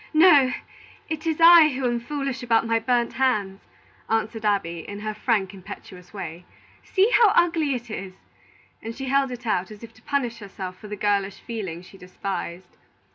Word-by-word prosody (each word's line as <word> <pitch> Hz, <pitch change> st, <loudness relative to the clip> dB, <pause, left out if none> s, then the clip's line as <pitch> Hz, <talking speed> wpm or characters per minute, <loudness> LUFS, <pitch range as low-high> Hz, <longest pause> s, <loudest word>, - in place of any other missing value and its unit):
"No; 295 Hz, -6 st, +7 dB, 0.6 s
it 315 Hz, +1 st, -4 dB
is 320 Hz, -1 st, 0 dB
I 335 Hz, -1 st, +9 dB
who 265 Hz, -2 st, -3 dB
am 240 Hz, -1 st, +1 dB
foolish 275 Hz, +1 st, -4 dB
about 230 Hz, -2 st, +2 dB
my 230 Hz, 0 st, +1 dB
burnt 240 Hz, +1 st, 0 dB
hands," 210 Hz, -7 st, 0 dB, 0.5 s
answered 225 Hz, 0 st, -1 dB
Abby, 195 Hz, -5 st, 0 dB
in 205 Hz, +5 st, -8 dB
her 215 Hz, 0 st, -3 dB
frank, 210 Hz, -3 st, 0 dB
impetuous 180 Hz, -1 st, -11 dB
way. 175 Hz, -4 st, -7 dB, 0.4 s
"See 400 Hz, +4 st, +2 dB
how 460 Hz, -4 st, +6 dB
ugly 325 Hz, -5 st, +2 dB
it 240 Hz, -2 st, -7 dB
is!" 190 Hz, -3 st, -6 dB, 0.7 s
And 225 Hz, +1 st, -6 dB
she 270 Hz, -1 st, -5 dB
held 275 Hz, 0 st, +2 dB
it 245 Hz, 0 st, -8 dB
out, 190 Hz, -4 st, 0 dB
as 215 Hz, +1 st, -12 dB
if 230 Hz, 0 st, -11 dB
to 220 Hz, -, -21 dB
punish 245 Hz, -4 st, -2 dB
herself 190 Hz, -3 st, -7 dB
for 210 Hz, -, -10 dB
the 210 Hz, -, -5 dB
girlish 200 Hz, -1 st, 0 dB
feeling 190 Hz, -8 st, -6 dB
she 195 Hz, +1 st, -15 dB
despised. 180 Hz, -1 st, -6 dB
225 Hz, 180 wpm, -24 LUFS, 195-265 Hz, 0.7 s, I